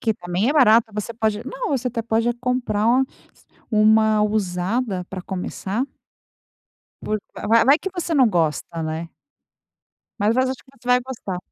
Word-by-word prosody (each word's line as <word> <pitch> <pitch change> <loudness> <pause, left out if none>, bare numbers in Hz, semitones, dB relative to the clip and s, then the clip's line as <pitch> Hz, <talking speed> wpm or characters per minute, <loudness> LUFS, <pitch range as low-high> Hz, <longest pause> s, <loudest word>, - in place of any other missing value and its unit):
Que 220 -2 0
também 180 +4 -1
é - - +2
barato. 230 -6 +5
Você 210 +2 -4
pode 220 -1 -1
não, - - -4
você 255 -2 0
até 235 -1 -3
pode 225 +1 +1
comprar 245 -3 -1 0.8
uma 215 0 +4
usada 200 0 -1
para 185 -1 -6
começar. 190 +5 -3 1.2
Por 215 - -1 0.3
vai 230 0 +6
vai 280 +3 +6
que 385 - -5
você 345 -2 -3
não 260 -5 +5
gosta, 165 -2 -1
né? 160 +1 -4 1.1
Mas 210 +3 +3
va 255 - +3
acho 260 0 -1
que 260 - -21
você 245 - -19
vai 250 0 +5
gostar. 240 -8 -6
220 Hz, 155 wpm, -22 LUFS, 195-250 Hz, 1.2 s, vai